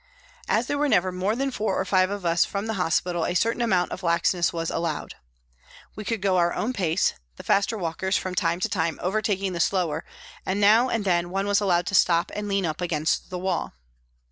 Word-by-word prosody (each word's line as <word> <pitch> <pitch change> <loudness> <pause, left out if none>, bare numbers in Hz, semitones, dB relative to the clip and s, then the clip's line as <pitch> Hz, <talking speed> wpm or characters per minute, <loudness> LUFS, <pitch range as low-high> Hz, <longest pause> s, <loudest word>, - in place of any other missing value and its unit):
As 230 - +2
there 285 +2 -2
were 295 0 +2
never 185 -5 +2
more 185 +4 -1
than 270 +2 -1
four 220 -3 -1
or - - -1
five 185 0 +3
of 200 -2 -5
us 170 0 +3
from 200 0 -4
the 220 - -2
hospital 175 -2 0
a 175 - -1
certain 230 +5 +1
amount 185 -6 +1
of - - -5
laxness 170 0 +1
was 165 -1 -3
allowed. 165 -3 -3 0.8
We 215 - -6
could 215 -1 -3
go 190 -2 +2
our 175 0 +2
own 245 +4 -1
pace, 175 -5 +1 0.2
the - - -11
faster 200 +3 +1
walkers 190 +1 -1
from 185 - -4
time 175 -2 0
to - - +2
time 170 -7 -1
overtaking 195 0 -1
the 170 - -4
slower 170 -4 0 0.4
and 190 +2 -2
now 220 +5 +5
and 225 -4 -1
then 175 -2 +1
one 195 +2 -1
was 205 0 +2
allowed 175 -3 +2
to 200 - -4
stop 170 -2 +3
and 210 0 -4
lean 195 -2 0
up 155 +1 -3
against 160 -2 -1
the 185 - -4
wall. 185 +1 -2
185 Hz, 220 wpm, -25 LUFS, 175-205 Hz, 0.8 s, now